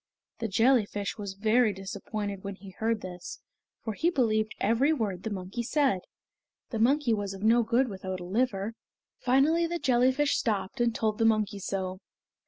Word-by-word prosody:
The 225 - -1
jellyfish 215 -1 +2
was 200 -2 -5
very 220 +3 +3
disappointed 200 +1 -5
when 200 0 -5
he 195 0 -12
heard 220 +3 -1
this, 180 -1 -8 0.4
for 220 - -3
he 330 +11 +1
believed 220 -8 +1
every 235 +8 +3
word 210 - -1
the 220 - -4
monkey 195 +3 -4
said. 265 -4 +1 0.7
The 225 - -2
monkey 260 +1 +3
was 200 -2 -2
of 195 - -9
no 230 +2 +5
good 235 +3 +2
without 190 -3 -5
a - - -7
liver. 210 +1 0 0.5
Finally 290 +7 +3
the 345 +1 -2
jellyfish 260 +1 +2
stopped 205 +1 -1
and 235 -1 +2
told 215 -1 0
the - - +3
monkey 215 -2 +2
so. 190 -1 -3
220 Hz, 170 wpm, -28 LUFS, 195-245 Hz, 0.7 s, no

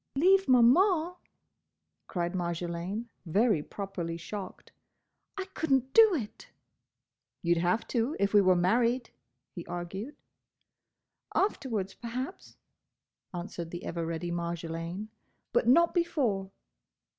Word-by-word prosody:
"Leave 380 +7 +4
Maman—!" 315 - +5 0.9
cried 175 -2 -2
Marjolaine, 175 +5 -3
very 200 0 +2
properly 175 -2 -5
shocked. 185 +3 -8 0.7
"I 385 - -3
could 320 -3 -3
n't 265 0 +2
do 440 -4 +7
it!" 225 -9 -6 1.0
"You 170 0 +4
'd 170 - 0
have 180 +6 +1
to 240 +5 0
if 200 0 +1
we 205 - +7
were 185 -1 +4
married," 235 +7 +2 0.4
he 175 - -6
argued. 190 - -5 1.2
"Afterwards, 230 - 0
perhaps," 250 - -6 0.7
answered 175 -2 -6
the 175 +1 -7
ever 170 -1 -3
ready 165 +1 -3
Marjolaine, 170 +3 -4 0.4
"but - - +2
not 335 +7 +5
before." 250 - 0
200 Hz, 110 wpm, -30 LUFS, 175-255 Hz, 1.2 s, do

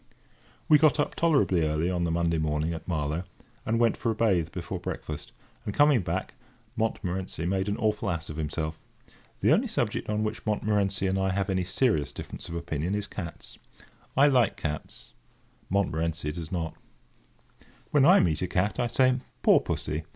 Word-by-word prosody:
We 150 - +7
got 155 0 +4
up 145 - +1
tolerably 140 - +3
early 80 +3 0
on 90 -1 0
the - - 0
Monday 85 -1 +1
morning 80 +1 0
at 80 -1 -8
Marlow, 80 0 -1 0.4
and 115 +1 +1
went 115 -1 +3
for 115 - -2
a 110 - 0
bathe 95 -8 +2
before 90 0 -5
breakfast; 75 -3 -6 0.3
and, 105 - -4
coming 145 -5 +5
back, - - -3 0.4
Montmorency 95 -6 -2
made 95 +2 0
an 100 - -1
awful 105 -1 0
ass 85 -2 -3
of 75 - -7
himself. 80 0 -3 0.6
The - - +5
only - - +2
subject - - -2
on 105 0 0
which 110 0 -3
Montmorency 105 -2 0
and 95 0 +1
I 95 0 +1
have 95 +1 0
any 95 -1 0
serious 95 - +1
difference - - -8
of 85 - -5
opinion 85 +2 -2
is 105 -1 -2
cats. 85 -7 -8 0.6
I 140 - +7
like 125 -8 +3
cats; 75 -6 -6 0.6
Montmorency 80 -5 0
does 80 0 -7
not. 85 -3 -2
[Picture: - - -29 0.8
Cat] - - -25 0.2
When 145 -2 +5
I 180 +5 +7
meet 80 -3 +1
a 90 - 0
cat, 95 +3 0
I 120 - +2
say, 130 +1 +3 0.3
"Poor - - +7
Pussy!" - - -2
95 Hz, 180 wpm, -28 LUFS, 80-110 Hz, 0.8 s, We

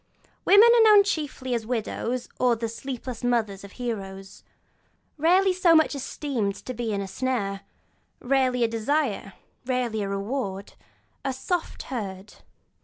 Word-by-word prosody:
Women 415 +4 +8
are 470 - +6
known 420 -2 +8
chiefly 295 -8 -3
as 235 - 0
the 220 - -14
widows 240 +1 -2
and 245 -3 +2
the 230 - -1
'sleepless' 250 +1 -6
mothers 220 -5 0
of 200 - -11
heroes; 195 -6 -6 0.7
rarely 365 +5 +4
so 355 -2 +4
much 315 -1 +4
esteemed 260 -7 -3
as - - -11
to 255 - -5
be 235 -2 -3
a 200 -1 -2
snare, 200 -4 -2 0.6
rarely 255 -1 +1
a - - +4
desire, 225 -3 -1 0.3
rarely 245 -4 -1
a 200 - -2
reward; 200 -1 -3 0.5
'a 270 -1 -1
soft 330 +6 -3
herd.' 205 -5 -6
245 Hz, 145 wpm, -25 LUFS, 205-275 Hz, 0.7 s, Women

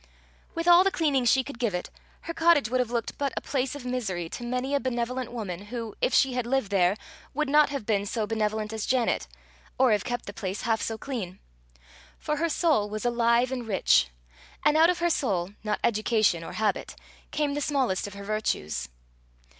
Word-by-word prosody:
'" - - -32
With 335 +1 -2
all 350 +1 +8
the 390 - +3
cleaning 290 -8 +1
she 260 +3 +4
could 280 -2 -9
give 230 -6 0
it, 180 - -4 0.3
her 335 - -5
cottage 325 -9 +4
would 255 - +2
have 250 -2 0
looked 235 -1 -3
but 280 -1 0
a - - 0
place 265 -1 -2
of 280 -3 -8
misery 205 -10 -2
to 240 - -7
many 250 +3 -2
a 285 - +3
benevolent 250 -1 -2
woman, 200 -5 -5
who, 230 -1 -5
if - - +2
she 265 -1 +4
had 250 -1 -2
lived 265 -5 0
there, 190 0 +3 0.4
would 305 +1 0
not 295 +1 +5
have 280 -6 -4
been 205 -2 0
so 220 +1 -1
benevolent 215 0 -1
as 220 -1 -3
Janet, 240 - +1 0.5
or 255 -2 +4
have 205 -1 +2
kept 245 -1 -3
the 200 - -7
place 195 0 -4
half 225 -1 +1
so 225 - -2
clean. 220 -9 -5 0.8
For 300 - -2
her 335 +2 0
soul 300 -11 +2
was 215 +2 -5
alive 240 +1 +2
and 250 -3 -4
rich, 190 - +3 0.6
and 300 0 +5
out 325 +2 +6
of 360 - +1
her 345 0 +1
soul, 195 - 0
not 210 -1 -1
education 215 -5 +2
or - - -7
habit, 215 -2 -1 0.3
came 295 -2 -1
the 290 - -2
smallest 265 -11 0
of 200 - -10
her 200 - -8
virtues. 80 - -2
235 Hz, 210 wpm, -27 LUFS, 210-270 Hz, 0.8 s, all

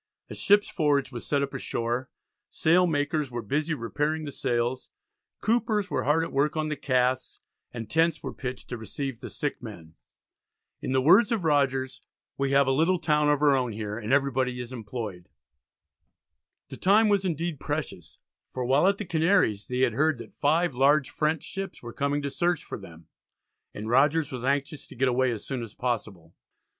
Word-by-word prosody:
A - - -4
ship's 205 +1 +4
forge 145 -6 +1
was 120 -2 -7
set 140 -1 +1
up 140 - -4
ashore; 120 -1 -2 0.4
sail 180 +3 +3
makers 150 -2 0
were 120 -1 -5
busy 150 +8 -1
repairing 150 +5 -2
the 145 - -5
sails; 120 0 -2 0.5
coopers 215 -3 +1
were - - -1
hard 155 +4 +3
at - - -5
work 145 +3 +1
on 155 0 -1
the 150 - -1
casks; 130 -2 0 0.3
and 115 -2 -6
tents 165 +1 +1
were - - -5
pitched 125 -1 -6
to 120 - -5
receive 130 +2 -5
the - - -7
sick 145 - -4
men. 85 -9 -10 0.9
In - - -3
the 130 0 +2
words 190 - +6
of 220 -6 0
Rogers 135 -4 +1 0.3
"we 140 0 -1
have 140 0 +4
a 135 - +1
little 165 +7 +3
town 150 -3 +2
of 145 0 +2
our 145 -2 +5
own 125 -3 -1
here, 105 -1 -4
and 110 0 -4
every 140 0 +3
body 125 -1 -1
is 125 +1 -6
employed." 105 -6 -6 1.4
The - - -8
time 210 +4 +4
was 200 -2 +2
indeed 170 -3 -2
precious, 145 - -5 0.3
for 125 -1 -4
while 135 +8 +4
at 200 0 +3
the 210 - -5
Canaries 165 - +2
they 125 0 -2
had 125 -4 +3
heard 150 +3 +2
that 115 - -11
five 160 +2 +1
large 140 +2 +3
French 155 0 0
ships 195 -6 -6
were 120 -1 -7
coming 140 +1 -1
to 140 - -3
search 175 +2 0
for - - -7
them, 85 -4 -13 0.7
and 105 +1 -7
Rogers 145 +5 +3
was 125 -2 -5
anxious 140 +2 -1
to - - -13
get 130 +1 +2
away 130 +1 +2
as 115 -4 -4
soon 130 -3 -3
as 115 -3 -8
possible. 105 -9 -4
140 Hz, 190 wpm, -27 LUFS, 125-155 Hz, 1.4 s, words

